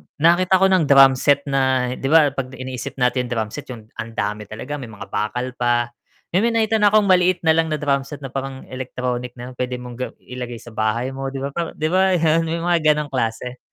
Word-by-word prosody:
nakakita 175 +4 +4
ko - - +7
ng 185 -3 +4
drum 135 -1 +8
set 140 0 +3
na 130 -3 +1
'di 130 +1 -4
ba 150 -1 +5
'pag 130 -1 -5
iniisip 130 -2 -6
natin 125 -1 +1
drum 110 -3 -2
set 145 - -8
'yung 115 -4 -10
ang 115 0 -6
dami 105 0 -3
talaga, 130 +8 -6
may 130 - -7
mga 105 -2 -11
bakal 125 +4 -2
pa, 120 0 +1 0.4
may 180 - +3 0.2
nakita 220 0 +2
na 210 - +5
akong 215 0 +5
maliit 185 -2 +3
na 160 - +5
lang 160 0 +2
na 155 - -1
drum 140 -2 0
set 145 0 -9
na 135 - -6
parang 135 -1 -5
electronic 125 -1 -4
na 125 0 -8
puwede 125 0 -3
mong 125 -1 -8
ga 125 - -2 0.2
ilagay 125 -1 -6
sa 115 0 -12
bahay 110 +4 -1
mo, 135 0 -5
'di 135 0 -5
ba, 140 - -3
p 170 +3 -4
'di 155 - -1
ba 190 0 +3
'yun 165 0 +2
'yung 165 +1 -2
mga 175 -1 +2 0.2
gano'ng 150 -1 -4
klase. 125 0 -2
135 Hz, 225 wpm, -21 LUFS, 125-160 Hz, 0.4 s, drum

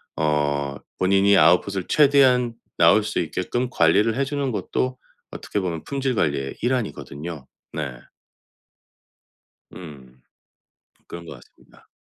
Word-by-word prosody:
어 75 -2 0 0.2
본인이 100 +1 +4
아웃풋을 90 +3 +3
최대한 130 -5 +4 0.2
나올 110 - +5
수 105 - -4
있게끔 95 +10 -2
관리를 105 +7 +3
해주는 140 0 -1
것도 130 +3 -2 0.3
어떻게 105 - -4
보면 85 -4 -4
품질 135 -2 -2
관리의 70 - -1
일환이거든요, 85 - -4 0.2
네. 75 -4 -4 1.8
음. 65 -7 -12 0.9
그런 85 0 -9
것 - - -9
같습니다. - - -21
95 Hz, 250 characters per minute, -23 LUFS, 75-125 Hz, 1.8 s, 나올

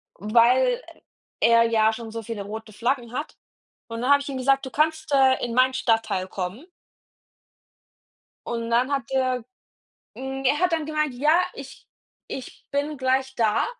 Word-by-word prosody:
weil 240 - +3 0.6
er 230 0 +6
ja 220 -1 +3
schon 225 0 -7
so 230 +1 -5
viele 220 -2 -5
rote 215 +2 -8
Flaggen 240 +2 -1
hat.“ 295 +4 -5 0.5
Und 230 0 -5
dann 255 +3 +2
habe 285 0 +6
ich 280 - -6
ihm 270 - -4
gesagt: 270 +1 +2
„Du - - -9
kannst, 315 +1 0
äh, 265 -1 +4
in 235 - -4
mein 255 +1 +4
Stadtteil 225 -7 0
kommen.“ 190 - -5 1.8
Und 230 -1 -3
dann 245 +3 +2
hat 270 -4 -2
er 255 -2 0 0.7
hm, 270 0 -5
er 275 +3 +3
hat 360 -1 +2
dann 320 -2 0
gemeint: 305 -3 -1
„Ja, 300 +6 +3 0.2
ich 270 -1 -11 0.4
ich 260 - -8
bin 290 +2 -2
gleich 265 0 0
da.“ 220 -4 +2
255 Hz, 160 wpm, -24 LUFS, 230-280 Hz, 1.8 s, er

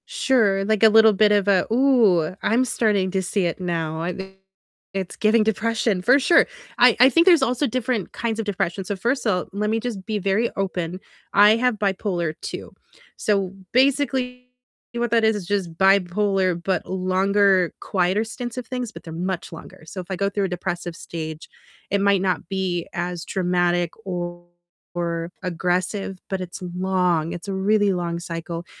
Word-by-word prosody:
Sure, 230 - +1
like 215 +1 +1
a 220 - +9
little 220 0 +6
bit 210 +1 +4
of 205 -1 +2
a, 195 -2 +3
"Ooh, 225 - +3
I'm 245 +4 +2
starting 205 -6 +1
to 190 0 0
see 190 +1 -1
it 170 - -2
now, 165 -3 -3
I 175 +2 -2
think 190 +1 -9 0.6
it's 190 -2 -4
giving 215 +1 +3
depression," 220 -2 0
for 255 +9 +5
sure, 330 +5 +4 0.3
I 245 -2 +5
I 255 +2 +8
think 335 +4 +4
there's 340 -5 +7
also 255 +3 +1
different 250 -3 -2
kinds 225 -1 -3
of 225 - -2
depression, 195 -2 -2
so 200 +2 -3
first 240 +7 -1
of 215 - +3
all, 180 - -3
let 210 +1 -1
me 225 +1 +1
just 220 -5 -5
be 215 -2 -2
very 200 +4 +1
open, 185 -2 -3 0.3
I 205 +2 +7
have 245 -2 0
bipolar 190 -5 -1 0.2
II, - - -7 0.5
so 195 -3 0 0.2
basically 255 -1 +1 0.5
what 235 -1 -2
that 230 -1 +3
is 220 0 +3
is 185 -4 -8
just 190 -4 -1
bipolar, 190 -1 +2
but 185 -1 -1
longer, 190 0 +2
quieter 185 +3 0
stints 240 +2 -6
of 250 - -5
things, 250 -3 -4
but - - -12
they're 165 - -9
much 180 +1 -4
longer, 160 - -12
so 185 +4 -7
if 175 - -13
I - - -1
go 200 +1 0
through 200 0 -1
a - - -3
depressive 175 -1 -4
stage, 160 -2 -7 0.4
it 200 0 +1
might 200 -1 +3
not 185 0 -1
be 185 -3 -2
as 175 0 -3
dramatic 175 -2 0
or 175 -2 -5 1.0
aggressive, 185 +2 -2
but 190 -1 -2
it's 180 +1 -7 0.2
long 180 -3 +1
it's 175 +3 -8
a 195 - -3
really 200 +1 +2
long 170 -1 -3
cycle, 170 0 -6
195 Hz, 180 wpm, -22 LUFS, 180-220 Hz, 1.0 s, a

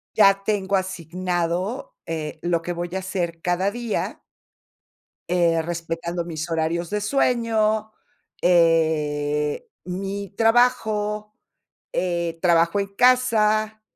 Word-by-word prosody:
ya 195 -2 +5
tengo 200 -2 0
asignado, 180 - -2
eh, 155 -1 -4
lo 175 -1 +1
que 175 +1 -3
voy 175 0 -4
a - - 0
hacer 175 -3 -3
cada 180 +3 +1
día 240 -1 -3 1.1
eh, 170 -2 +3
respetando 170 +1 -4
mis 165 -1 -5
horarios 165 +1 -1
de 210 0 -1
sueño, 220 -2 +1 0.5
eh, 150 -4 +2 0.2
mi 195 +2 -4
trabajo, 215 -3 +2 0.6
eh, 170 -2 -1
trabajo 170 +1 +3
en 200 0 -6
casa, 220 -3 +3
180 Hz, 105 wpm, -23 LUFS, 165-210 Hz, 1.1 s, ya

